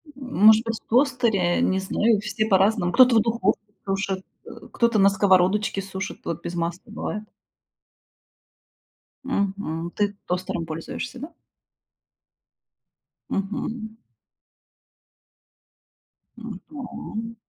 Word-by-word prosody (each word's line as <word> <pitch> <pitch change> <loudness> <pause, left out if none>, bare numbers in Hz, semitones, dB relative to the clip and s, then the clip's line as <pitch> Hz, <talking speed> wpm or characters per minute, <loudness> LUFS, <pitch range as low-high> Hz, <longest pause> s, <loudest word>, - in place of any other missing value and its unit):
М 255 -6 -1
может 220 +1 +8
быть, 230 -1 -2
в - - -43
тостере? 235 -8 +2
Не 190 - +2
знаю, 210 +3 +2
все 215 +1 -1
по-разному. 195 -2 +3
Кто-то 255 -2 +7
в - - +6
духовке 225 -3 +1 0.3
сушит, 195 -1 -1 0.2
э, - - -10 0.2
кто-то 235 -2 +2
на 195 0 +7
сковородочке 195 +1 +2
сушит. 195 0 -6
Вот 170 0 -3
без 170 - -5
масла 170 +4 -4
бывает. 215 -1 -4 2.0
Мгм. 195 -9 -2
Ты 205 0 0
тостером 180 -2 -2
пользуешься, 165 +10 -6
да? 300 +6 -8 2.0
Мгм. 220 +2 -3 2.5
Ну 225 -5 -7
да. 230 -5 -7
205 Hz, 105 wpm, -24 LUFS, 190-230 Hz, 2.5 s, может